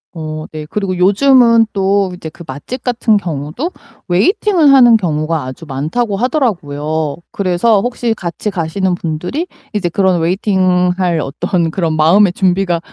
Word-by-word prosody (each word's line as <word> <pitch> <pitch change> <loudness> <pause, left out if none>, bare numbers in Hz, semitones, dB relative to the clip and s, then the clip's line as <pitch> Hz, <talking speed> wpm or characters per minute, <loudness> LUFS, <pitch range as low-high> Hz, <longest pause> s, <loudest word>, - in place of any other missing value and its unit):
어 155 -1 -6
네. 155 -1 -7
그리고 195 0 -2
요즘은 230 +4 +4
또 195 -1 +1
이제 165 -3 -8
그 170 - -13
맛집 150 - -7
같은 235 -3 +1
경우도 170 - -4 0.4
웨이팅을 320 - +3
하는 245 -4 +7
경우가 160 -5 -1
아주 130 +6 -8
많다고 195 - -2
하더라고요. 160 - -1
그래서 195 +2 +1
혹시 240 -1 -1
같이 185 +1 -4
가시는 185 +1 -1
분들이 175 - -4 0.3
이제 195 -5 -1
그런 185 0 +1
웨이팅 185 0 +1
할 175 -3 0
어떤 165 +4 -2
그런 165 -3 -1
마음의 175 +5 +4
준비가 185 -2 +1
185 Hz, 320 characters per minute, -15 LUFS, 160-220 Hz, 0.4 s, 하는